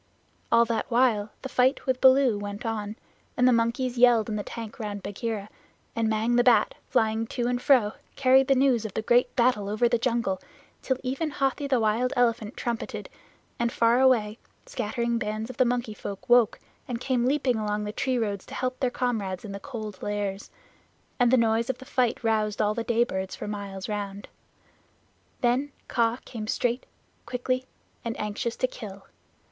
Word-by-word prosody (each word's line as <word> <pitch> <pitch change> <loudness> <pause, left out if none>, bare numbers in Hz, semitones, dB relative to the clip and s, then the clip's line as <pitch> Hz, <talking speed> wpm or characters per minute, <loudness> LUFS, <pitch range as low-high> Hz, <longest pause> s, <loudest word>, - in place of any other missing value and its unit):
All 235 0 +6
that 230 -1 -2
while 230 -4 +2
the - - -3
fight 255 +1 +2
with 260 -2 0
Baloo 260 -4 +5
went 205 +2 -6
on, 215 -2 -3 0.4
and 250 - +4
the 255 - +5
monkeys 240 +2 0
yelled 235 -3 +5
in 215 - -2
the 210 - -1
tank 225 +2 -8
round 205 -2 -5
Bagheera, 205 0 -4 0.5
and 225 -1 +1
Mang 220 +2 +1
the 245 - +5
Bat, 235 -4 +4 0.2
flying 220 0 +1
to 240 - -2
and 245 0 0
fro, 245 -7 +4 0.2
carried 265 0 +5
the 270 - +4
news 255 -4 +3
of 215 -3 -6
the 220 - -1
great 245 +2 +3
battle 235 -5 +2
over 215 +3 +2
the 235 0 +1
jungle, 235 -6 0 0.4
till 260 - 0
even 270 +5 -1
Hathi 280 0 -1
the 260 -3 +2
Wild 225 +3 +1
Elephant 235 -3 +1
trumpeted, 235 -2 -4 0.5
and, 235 0 +1
far 235 +1 +3
away, 230 -5 +3 0.3
scattered 235 0 -2
bands 215 +3 -3
of 255 - -15
the 255 - +4
Monkey 240 -2 -1
Folk 200 -1 -7
woke 240 -2 +4 0.3
and 240 -2 -3
came 250 -1 0
leaping 265 -3 +1
along 210 -1 -1
the 210 - -3
tree 255 +3 -1
roads 205 -4 -2
to - - -8
help 255 0 -2
their 255 - +1
comrades 220 -7 -2
in 205 - -6
the 200 - -6
Cold 215 -6 -7
Lairs, 205 -1 -3 0.7
and 245 -1 +5
the 260 - +5
noise 230 +1 +2
of 260 - -1
the 260 - -12
fight 245 -2 0
roused 215 -2 +1
all 210 0 +2
the 230 - -3
day 235 0 +2
birds 190 -5 -4
for - - -6
miles 200 -2 -5
round. 205 -1 -5 1.1
Then 255 +4 +1 0.2
Kaa 230 0 +1
came 215 -3 -6
straight, 245 +2 -1 0.4
quickly, 255 +1 -1 0.4
and 230 -1 -4
anxious 210 +3 -2
to - - +1
kill. 200 -6 -9
235 Hz, 185 wpm, -26 LUFS, 210-250 Hz, 1.1 s, All